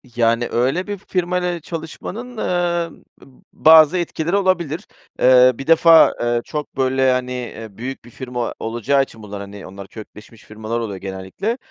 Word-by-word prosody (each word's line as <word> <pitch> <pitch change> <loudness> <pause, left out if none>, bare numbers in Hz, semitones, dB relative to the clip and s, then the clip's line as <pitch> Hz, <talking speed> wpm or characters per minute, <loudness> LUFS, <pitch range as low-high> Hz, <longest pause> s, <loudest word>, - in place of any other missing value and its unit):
Yani, 115 0 +2
öyle 135 - 0
bir 205 0 -4
firmayla 180 -2 -2
çalışmanın, 175 +9 -7
eee, 175 -3 -1 0.2
b - - -15 0.3
bazı 160 +1 +6
etkileri 170 0 -2
olabilir. 185 -3 0 0.3
Eee, 125 0 +6
bir 135 - -8
defa, 165 0 +6
eee, 120 0 0
çok 150 -3 -6
böyle, 130 0 +2
hani, 125 0 -1
eee, 120 -3 -6
büyük 130 +1 -6
bir - - -13
firma 125 -1 -5
olacağı 120 +5 +1
için 110 -4 -12
bunlar, 100 -1 -7
hani, 100 0 -9
onlar 95 +1 -10
kökleşmiş 110 +1 -13
firmalar 110 +2 -4
oluyor 105 -4 -4
genellikle. 95 - -4
130 Hz, 155 wpm, -20 LUFS, 115-170 Hz, 0.3 s, bazı